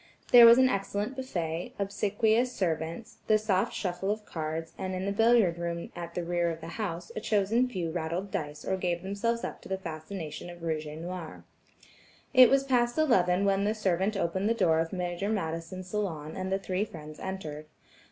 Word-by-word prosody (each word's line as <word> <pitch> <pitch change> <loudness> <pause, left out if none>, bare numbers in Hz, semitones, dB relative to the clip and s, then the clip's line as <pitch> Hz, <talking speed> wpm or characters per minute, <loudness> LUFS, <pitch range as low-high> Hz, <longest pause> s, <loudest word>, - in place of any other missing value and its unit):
There 240 -1 +11
was 230 +1 +9
an 260 0 +6
excellent 205 +2 -2
buffet, 175 -11 -3
obsequious 215 +4 +1
servants, 165 +1 -3
the 215 - +5
soft 205 -3 +1
shuffle 180 +1 -3
of 210 0 -2
cards, 160 -1 -4
and 185 -1 -4
in 185 +1 -3
the 200 - 0
billiard 220 -5 +4
room 170 0 -2
room 170 - -8
at 170 -1 -7
the 175 - -1
rear 175 0 0
of 165 -1 -4
the 165 0 -8
house, 175 -4 -4
a - - -2
chosen 215 +3 +2
few 175 -8 -3
rattled 175 +4 -3
dice 150 -1 -4
or 190 - 0
gave 175 -1 -1
themselves 225 +5 -1
up - - -5
to - - -12
the 190 - -1
fascination 160 -1 -6
of 175 -1 -11
rouge 155 -2 -2
et 150 - -7
noir. 170 -1 -7 0.9
It 255 -2 +9
was 275 0 +4
past 245 -2 +1
eleven 195 - +3
when 195 0 +2
the 210 +2 +1
servant 195 0 0
opened 190 +3 0
the 230 - +2
door 160 -7 +3
of 165 0 -1
Major 180 +1 -2
Madison's 180 -1 -3
salon 165 -7 -3
and 190 0 -3
the 195 - +2
three 190 0 -1
friends 155 -6 -9
entered. 155 -6 -6
185 Hz, 195 wpm, -29 LUFS, 170-210 Hz, 0.9 s, There